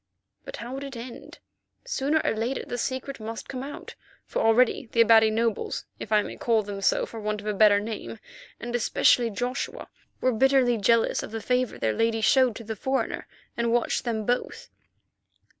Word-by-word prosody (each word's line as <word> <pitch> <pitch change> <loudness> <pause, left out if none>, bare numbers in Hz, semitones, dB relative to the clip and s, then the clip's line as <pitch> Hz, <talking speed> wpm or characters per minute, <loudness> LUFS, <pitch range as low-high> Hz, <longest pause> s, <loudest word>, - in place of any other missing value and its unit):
But - - -7
how 240 +2 -7
would 270 +1 -5
it 275 -3 -7
end? 235 +1 -9 0.5
Sooner 315 - 0
or - - +1
later 230 +5 -2
the 245 - -4
secret 260 +2 -3
must 225 +1 -6
come 255 -1 -5
out, 285 +2 -8 0.3
for - - -3
already 225 +2 +3
the 230 - +4
Abati 225 -1 +6
nobles, 225 0 -1
if 215 - -8
I 210 -1 +4
may - - -8
call 225 -2 +1
them 200 -1 -6
so - - +2
for 225 - -9
want 210 0 -2
of 205 - -11
a 210 - -1
better 205 0 +5
name, 220 +1 -6 0.4
and 240 0 -4
especially 240 0 +3
Joshua, 245 +5 -4 0.3
were 255 - +2
bitterly 260 0 +3
jealous 230 +3 +2
of - - -7
the 225 +1 -5
favour 250 +2 0
their 110 -1 0
lady 225 - +1
showed 245 +2 +4
to 230 - -8
the 220 0 -5
foreigner, 265 +6 -2 0.3
and 235 0 0
watched 240 0 +1
them 220 -3 -2
both. 245 +2 -2
230 Hz, 190 wpm, -26 LUFS, 220-255 Hz, 0.5 s, Abati